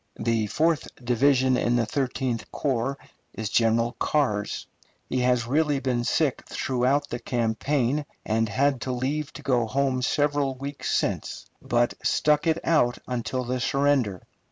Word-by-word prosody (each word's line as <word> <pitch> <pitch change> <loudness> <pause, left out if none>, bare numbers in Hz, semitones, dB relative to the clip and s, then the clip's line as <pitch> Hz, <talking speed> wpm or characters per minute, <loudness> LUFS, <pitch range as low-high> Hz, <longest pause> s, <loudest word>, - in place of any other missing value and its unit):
The 110 -1 0
fourth 155 +8 +1
division 130 +1 +2
in 120 0 +1
the 120 -1 +2
Thirteenth 125 -1 -2
Corps 135 -1 -1 0.4
is 110 -2 -4
General 115 +1 +2
Carr's. 105 -9 0 0.4
He 130 - -1
has 125 -1 +2
really 145 +2 +1
been 125 -3 -1
sick 135 +3 +1
throughout 135 +3 0
the 120 - -4
campaign, 125 +4 0 0.2
and 110 0 +1
had 135 +1 +1
leave 135 +4 -2
to - - -10
go 125 -4 +1
home 130 +1 0
several 145 0 +1
weeks 140 +2 -5
since, - - -1 0.2
but 120 0 +1
stuck 150 +2 +2
it 160 0 +3
out 120 -7 +3 0.3
till 130 +2 -2
the 125 +1 -2
surrender. 135 -7 +1
130 Hz, 140 wpm, -26 LUFS, 120-140 Hz, 0.4 s, it